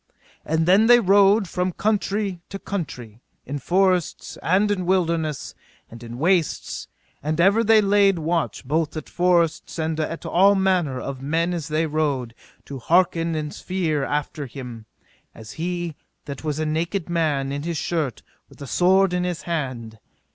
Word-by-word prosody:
And 160 +1 0
then 195 +5 +5
they 240 0 +8
rode 200 0 +4
from 180 +1 -2
country 205 -2 -1
to 195 - -5
country, 125 - -6 0.2
in 145 +2 -4
forests, 185 +3 0
and 200 +5 +2
in 185 -3 -2
wilderness, 165 -5 0 0.4
and 115 +1 -11
in 120 0 -8
wastes; 170 +2 0 0.3
and 155 +3 -2
ever 200 +6 +4
they 220 0 +5
laid 200 -2 +3
watch 165 -2 -2
both 155 +2 -1
at 155 - -6
forests 175 -3 +1
and 160 -1 -2
at 165 +1 -3
all 195 +3 +4
manner 180 -9 +1
of 135 -1 -6
men 165 +5 0
as 165 -4 -4
they 155 +1 0
rode, 145 -6 -1 0.3
to 140 -2 -7
hearken 165 +2 +2
and 150 -1 -3
spere 165 -6 -2
after 145 0 -3
him, 120 -3 -9 0.5
as 110 -1 -10
he 175 +2 -3 0.3
that 140 0 -7
was 150 -2 -2
a 155 - -1
naked 165 +4 -2
man, 155 -5 0
in 140 +1 -3
his 165 +1 -3
shirt, 155 -6 -2 0.3
with - - -18
a 140 - -7
sword 185 +5 +3
in 180 0 0
his 180 -2 -3
hand. 130 -9 -4
165 Hz, 160 wpm, -23 LUFS, 145-185 Hz, 0.5 s, they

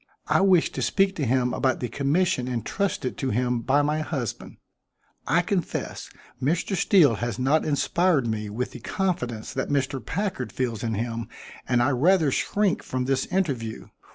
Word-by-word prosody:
I - - +3
wish 185 -4 +4
to - - -4
speak 195 0 +2
to 145 -6 -1
him 125 0 +1
about 130 -2 +1
the 125 - -2
commission 140 +3 0
intrusted 125 - -2
to 135 - -1
him 125 +1 0
by 140 +4 +2
my 150 +1 0
husband. 135 - -4 0.7
I 175 +1 +3
confess 180 -1 -3 0.3
Mr. 170 +8 0
Steele 165 - +4
has 120 -2 -3
not 135 +5 +2
inspired 155 0 +2
me 110 -2 -2
with 120 +5 -3
the 125 - -9
confidence 125 - -2
that 130 -1 -2
Mr. 135 -2 -1
Packard 180 - -3
feels 120 -4 -2
in 115 -2 -1
him 115 +1 -3 0.4
and 120 -1 +3
I 140 - +2
rather 155 +3 +3
shrink 200 +7 +1
from 130 -1 -3
this 135 0 0
interview. 135 -12 -2
135 Hz, 165 wpm, -25 LUFS, 120-175 Hz, 0.7 s, wish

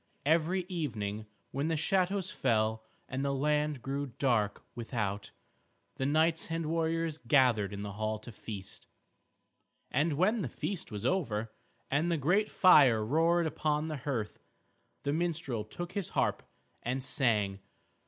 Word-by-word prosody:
Every 165 +4 +2
evening 110 - -4 0.2
when 140 +4 -1
the 165 -1 0
shadows 190 +3 +1
fell, 110 - +1 0.2
and 135 +1 -3
the 140 0 0
land 150 -1 0
grew 140 +1 -2
dark 120 -5 0
without, 110 -4 -3 0.7
the 135 - 0
knights 160 +3 +2
and 165 0 -2
warriors 165 0 0
gathered 120 -5 +3
in 100 0 -5
the 100 - -5
hall 110 +1 -2
to 115 +3 -10
feast. 100 -3 -7 1.0
And 150 +4 +2
when 200 +9 +2
the 140 - -2
feast 185 - -4
was 105 +1 -5
over, 115 - 0 0.4
and 155 +5 +2
the 170 - +2
great 180 +9 +2
fire 130 - +6
roared 165 +6 +3
upon 155 0 0
the 155 - -3
hearth, 125 -6 -3 0.6
the 140 - 0
minstrel 160 -9 -1
took 175 - -7
his 200 -3 -2
harp - - 0 0.4
and 130 +2 -2
sang. 105 -8 +2
140 Hz, 145 wpm, -31 LUFS, 110-165 Hz, 1.0 s, fire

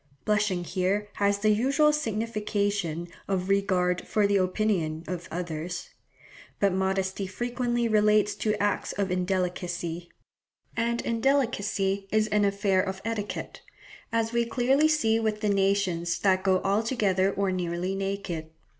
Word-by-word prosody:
Blushing 210 -4 +1
here 190 +4 -1
has 200 0 +2
the 215 +1 +2
usual 275 +7 +3
signification 205 - -1 0.2
of 190 -1 -1
regard 185 -3 +1
for 210 -1 +2
the 200 0 +3
opinion 185 -4 0
of 175 -2 -5
others. 175 0 -5 0.7
But 200 -2 +3
modesty 190 +1 -1
frequently 240 +3 -1
relates 210 -1 +3
to 215 -1 0
acts 205 0 0
of 195 -2 -1
indelicacy; 180 -2 -2 0.7
and 235 +1 0
indelicacy 220 -6 0
is 215 0 +3
an 210 -1 +3
affair 200 -1 +2
of 190 0 -5
etiquette, 210 -4 -4 0.5
as 230 0 0
we 235 0 +3
clearly 260 +6 +2
see 225 -8 +2
with 215 -1 -1
the 210 - +1
nations 195 -4 +1
that 190 -2 +3
go 190 -1 +2
altogether 200 -2 +1
or 195 -1 0
nearly 180 0 -2
naked. 195 -5 -3
200 Hz, 130 wpm, -27 LUFS, 185-215 Hz, 0.7 s, usual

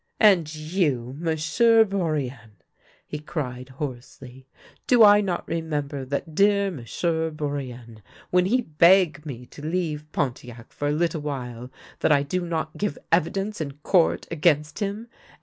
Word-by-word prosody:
" - - -45
And 165 -5 -4
you, 155 -6 -1
M'sieu' 170 +8 +3
Bourienne! 145 - -3 0.3
" - - -33
he 150 - -5
cried 130 -5 -5
hoarsely. 130 -1 -8 0.2
" - - -28
Do 245 -3 +6
I 205 0 +8
not 185 -4 -3
remember 150 -4 -3
that 140 +4 -4
dear 200 +2 +3
M'sieu' 160 +4 -2
Bourienne, 130 -7 -6 0.3
when 180 0 +3
he 250 +5 +2
beg 170 - +4
me 125 -3 -7
to 145 - -13
leave 155 -2 -3
Pontiac 120 -3 -4
for 145 - -3
a - - +1
little 160 0 0
while 125 -4 -5 0.3
that - - +2
I 140 -1 +4
do 180 +6 -2
not 160 -2 -3
give 205 0 -2
evidence 195 +5 0
in 140 -3 -4
court 175 -4 +2
against 150 -2 +1
him 205 +3 -3
155 Hz, 150 wpm, -24 LUFS, 135-180 Hz, 0.3 s, I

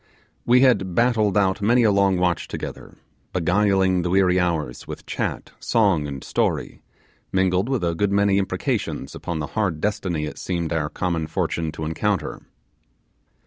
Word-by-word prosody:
We 125 +1 +6
had 95 -9 +3
battled 110 -5 +2
out 95 0 +2
many 120 +4 +4
a 110 - +4
long 100 -2 +3
watch 90 -1 0
together, - - -7 0.4
beguiling 95 +1 +2
the 90 - -2
weary 95 0 +3
hours 80 -8 -2
with - - -8
chat, - - -3
song, 95 -10 +2
and 70 -2 -6
story, - - -1 0.5
mingled 95 +3 +1
with 130 -8 0
a 85 -1 +1
good 100 +4 0
many 100 0 +3
imprecations 95 - -2
upon 85 - -4
the 75 - -2
hard 95 -8 0
destiny 90 -5 -1
it 75 - -7
seemed 85 -3 -2
our 75 -2 -1
common 85 -3 -2
fortune 80 0 -2
to 80 - -5
encounter. 80 +1 -2
95 Hz, 155 wpm, -23 LUFS, 85-100 Hz, 0.5 s, We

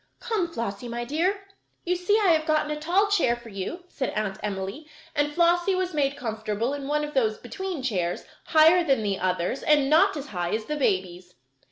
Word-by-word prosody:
"Come, 390 -7 -1
Flossie, 230 -4 -4
my 240 0 -4
dear, 350 +9 0 0.4
you 360 +1 +1
see 360 +4 +2
I 400 -4 +3
have 315 -1 +2
gotten 305 -1 +1
a - - -1
tall 355 +6 +2
chair 345 -13 +2
for 240 -1 -12
you," 200 - -5
said 270 -6 -3
Aunt 210 -1 -2
Emily, 200 +8 -4 0.3
and 290 +1 +1
Flossie 345 +3 +3
was 370 -1 -1
made 280 -2 0
comfortable 220 0 -2
in 280 -1 -5
one 300 +1 0
of 295 0 -5
those 220 -5 +1
"between" 335 +5 -5
chairs, 180 -8 -1 0.2
higher 320 +3 +6
than 270 -8 +1
the 200 -2 -1
others, 185 +6 -1
and 290 -2 +3
not 335 +2 +5
as 285 0 -7
high 175 0 -2
as 220 0 -5
a - - +1
baby's. 185 -8 -1
280 Hz, 200 wpm, -26 LUFS, 215-335 Hz, 0.4 s, higher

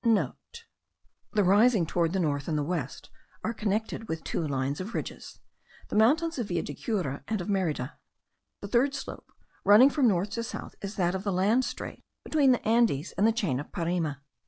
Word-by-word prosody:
(* - - -50
The 235 - -3
risings 205 -1 +4
towards 170 -1 +1
the 190 - +1
north 145 -4 -1
and 150 -2 -1
west 145 -4 -4 0.3
are 225 - -1
connected 220 +1 -2
with 160 -3 -4
two 160 - -2
lines 140 +2 -1
of 210 +5 -6
ridges, - - -6 0.5
the - - -4
mountains 300 +8 +3
of 235 - -2
Villa 175 -3 -1
de 145 - -6
Cura 150 - -3
and 220 -2 -1
of 180 - -5
Merida. 155 -8 -1 0.6
The 200 - -5
third 255 +6 +2
slope, - - -8 0.3
running 225 +7 +7
from 275 -4 +3
north 195 -1 +1
to 230 - -2
south, - - -7
is 200 +1 -5
that 175 -2 +1
of 190 0 -3
the 200 - -1
land 205 +8 +2
strait - - -6 0.2
between 285 -4 +3
the 245 - 0
Andes 220 - +2
and 210 - +2
the - - +4
chain 195 - -1
of 145 - -8
Parime. 170 -4 -1
200 Hz, 190 wpm, -28 LUFS, 165-230 Hz, 0.6 s, running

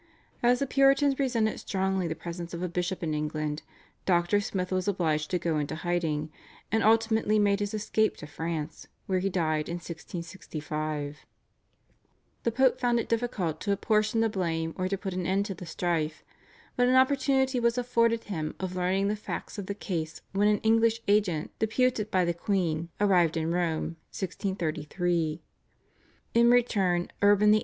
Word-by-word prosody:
As 245 +1 +4
the 275 - 0
Puritans 275 +1 +3
resented 235 -5 +1
strongly 190 -2 -1
the 160 - -3
presence 170 +1 -6
of 170 - -4
a - - 0
bishop 180 +1 -2
in 155 -2 -1
England, 150 0 -2 0.5
Dr. 175 +3 +3
Smith 185 -2 -3
was 185 0 0
obliged 160 -6 0
to 180 - +1
go 165 -3 0
into 145 +1 -3
hiding, 160 -2 -1 0.4
and 220 +1 +2
ultimately 220 -1 +3
made 200 -1 +3
his 205 +1 -2
escape 215 +1 +1
to - - -8
France, 160 +1 -5 0.2
where 185 -1 +1
he 195 +2 0
died 155 -4 0
in 170 - -2
1665. 155 -4 -5 1.2
The 235 - 0
Pope 255 +2 +3
found 240 -1 +2
it - - -4
difficult 210 -9 -1
to 205 - -1
apportion 215 +2 +2
the 225 - +3
blame 165 -5 -2
or 185 0 -1
to 195 +1 -1
put 190 -1 -4
an 180 -1 -2
end 195 +2 +1
to 200 - -3
the 180 -1 -10
strife, 160 -2 -1 0.5
but 245 0 +3
an 255 - +4
opportunity 265 0 +3
was 235 0 +2
afforded 230 -2 +2
him 160 -7 -4
of 185 -1 -4
learning 185 +2 +1
the 210 - 0
facts 210 0 -6
of 195 - -6
the 200 - -3
case 160 -6 -4
when 200 +2 +2
an 210 0 +4
English 225 +1 +3
agent 200 -7 +2
deputed 220 -1 +1
by 185 -3 +2
the 170 - +1
queen 170 -3 -1
arrived 180 -5 +3
in 160 +1 0
Rome 165 -1 -1 0.2
(1633). 170 -3 -2 0.9
In 235 0 +5
return 195 -8 +2
Urban 205 +1 +5
VIII. 215 - +5
190 Hz, 170 wpm, -28 LUFS, 165-220 Hz, 1.2 s, In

